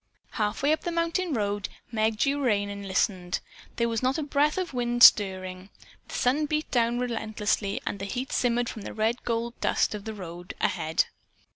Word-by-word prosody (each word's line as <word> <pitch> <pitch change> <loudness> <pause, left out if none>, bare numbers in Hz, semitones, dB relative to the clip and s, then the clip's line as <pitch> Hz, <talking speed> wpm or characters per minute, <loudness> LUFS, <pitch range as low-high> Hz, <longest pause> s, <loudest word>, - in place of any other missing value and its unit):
Half 210 +2 -2
way 290 - +4
up 315 - -1
the 345 - -3
mountain 335 +1 0
road 205 -2 -1 0.2
Meg 220 -1 +1
drew 280 +4 +1
rein 205 -4 +1
and 200 0 -7
listened. 185 -2 0 0.4
There 235 - +1
was 230 -1 -1
not 260 +3 +1
a 310 - -1
breath 295 +2 +1
of 365 -5 -2
wind 240 -1 +1
stirring. 185 -2 +5 0.4
The - - -7
sun 290 +5 +2
beat 305 +1 -2
down 235 -1 +2
relentlessly 220 -4 -1
and 200 - -3
heat 245 +7 -4
shimmered 245 -1 +1
from 220 - -6
the - - -7
red 220 +3 0
gold 235 0 -1
dust - - +2
of 210 -1 -6
the 220 -1 -5
road 175 -2 -8
ahead. 160 +1 +1
230 Hz, 185 wpm, -27 LUFS, 200-255 Hz, 0.4 s, stirring